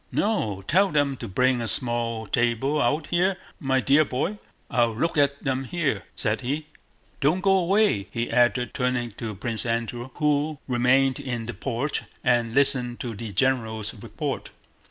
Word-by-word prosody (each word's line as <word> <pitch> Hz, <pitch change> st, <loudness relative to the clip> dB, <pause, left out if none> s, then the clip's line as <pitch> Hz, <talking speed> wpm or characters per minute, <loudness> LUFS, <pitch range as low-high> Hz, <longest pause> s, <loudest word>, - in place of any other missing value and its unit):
"No, 110 Hz, -, 0 dB
tell 190 Hz, -, +3 dB
them 145 Hz, -3 st, +1 dB
to -, -, -6 dB
bring 125 Hz, +5 st, +2 dB
a 115 Hz, -, -2 dB
small 115 Hz, 0 st, 0 dB
table 120 Hz, +7 st, +1 dB
out 150 Hz, +1 st, +1 dB
here, 185 Hz, +2 st, +2 dB, 0.2 s
my 135 Hz, -5 st, +1 dB
dear 140 Hz, +4 st, +4 dB
boy. 155 Hz, +10 st, -2 dB, 0.3 s
I'll 120 Hz, -2 st, +1 dB
look 165 Hz, +8 st, 0 dB
at 140 Hz, -1 st, +2 dB
them 135 Hz, -1 st, -1 dB
here," 160 Hz, 0 st, -1 dB
said 110 Hz, 0 st, 0 dB
he. 145 Hz, +5 st, -2 dB, 0.5 s
"Don't 155 Hz, +6 st, +2 dB
go 195 Hz, 0 st, +3 dB
away," 190 Hz, -, +2 dB
he 115 Hz, 0 st, -3 dB
added, 125 Hz, 0 st, +2 dB
turning 125 Hz, -2 st, -1 dB
to 110 Hz, -3 st, -4 dB
Prince 115 Hz, +3 st, -3 dB
Andrew, 120 Hz, +1 st, -2 dB
who 150 Hz, 0 st, +1 dB
remained 130 Hz, +1 st, +3 dB
in 120 Hz, -3 st, -4 dB
the 120 Hz, -, -5 dB
porch 135 Hz, +3 st, -2 dB, 0.2 s
and 120 Hz, -2 st, +2 dB
listened 130 Hz, -3 st, +2 dB
to 120 Hz, -2 st, -4 dB
the 110 Hz, +1 st, -6 dB
general's 110 Hz, -1 st, 0 dB
report. 105 Hz, -, -5 dB
125 Hz, 160 wpm, -25 LUFS, 115-145 Hz, 0.5 s, dear